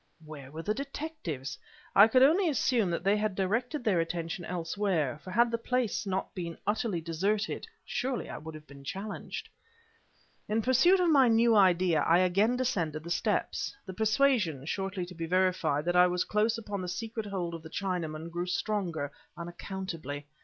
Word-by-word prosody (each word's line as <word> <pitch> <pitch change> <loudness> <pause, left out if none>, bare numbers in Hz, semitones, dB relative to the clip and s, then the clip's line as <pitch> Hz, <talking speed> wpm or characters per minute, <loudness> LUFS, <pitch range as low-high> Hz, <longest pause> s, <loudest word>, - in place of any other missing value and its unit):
Where 145 -4 -9
were 160 +3 -7
the 210 - 0
detectives? 275 - -5 0.4
I 200 +2 +9
could 255 +3 +5
only 335 +6 +5
assume 245 - +2
that 170 - -2
they 200 +1 +4
had 210 -2 -1
directed 235 +9 -1
their 205 -7 +2
attention 165 +1 -3
elsewhere, 170 -4 -1
for 185 - -9
had 235 +5 +3
the 230 - -1
place 245 -3 -1
not 190 0 -2
been 170 -4 -5
utterly 210 -4 0
deserted, 195 - -1 0.2
surely 255 0 -2
I - - -6
had 155 -1 -9
been 140 -1 -13
challenged. 200 - -5 1.0
In 220 +1 +1
pursuit 305 - +5
of 350 -2 +3
my 270 -4 +6
new 230 0 +4
idea, 180 -5 +4
I 165 +3 +4
again 195 +7 +3
descended 175 - -1
the 170 - -7
steps. 180 - -1
The 190 - -7
persuasion 215 - +2
(shortly 195 +2 -2
to 180 - -11
be 165 -1 -5
verified) 180 -5 +1
that 175 0 0
I 180 0 +7
was 180 0 0
close 215 +2 +1
upon 205 -3 -4
the 180 - -4
secret 220 +3 -4
hold 180 -4 -3
of 165 - -6
the 160 - -10
Chinaman, 170 -3 -3
grew 175 +1 -3
stronger, 175 -5 -2 0.3
unaccountably. 170 -4 -6
190 Hz, 175 wpm, -30 LUFS, 170-225 Hz, 1.0 s, I